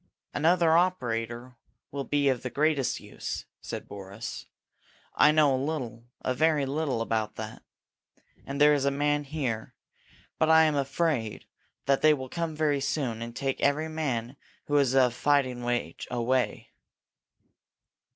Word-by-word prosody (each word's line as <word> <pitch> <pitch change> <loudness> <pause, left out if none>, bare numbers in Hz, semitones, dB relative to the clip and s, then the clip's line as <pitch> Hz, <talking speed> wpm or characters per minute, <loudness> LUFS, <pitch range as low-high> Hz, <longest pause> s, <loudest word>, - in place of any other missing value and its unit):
"Another 165 +1 +3
operator 120 -8 -1 0.3
will 140 -1 -4
be 145 -1 +1
of 130 -3 +2
the 130 - -4
greatest 145 0 +1
use," - - -6 0.2
said - - -6
Boris. 100 - -7 0.7
"I 150 - +6
know 150 -3 +4
a 130 - -1
little, 125 -7 -4 0.2
a 130 - 0
very 155 0 +2
little, 140 -3 -1
about 110 -2 -1
it. - - -7 0.8
And 140 +1 -5
there 150 0 +7
is 145 -2 +1
a 140 - +3
man 145 +1 0
here. 130 -7 -3 0.6
But 160 - +3
I 160 0 +7
am 155 -1 +3
afraid 140 -4 -1 0.4
that 135 0 +2
they 155 -1 +6
will 130 -2 -7
come 165 0 -3
very 150 -2 +1
soon 125 -6 -2
and 115 0 -6
take 135 -1 -2
every 150 +3 +2
man 135 -5 -3 0.3
who 145 - -1
is 135 -2 +3
of 125 -3 +4
fighting 130 -3 +1
age 120 -9 -2
away." 125 +1 -1
140 Hz, 150 wpm, -28 LUFS, 120-150 Hz, 0.8 s, there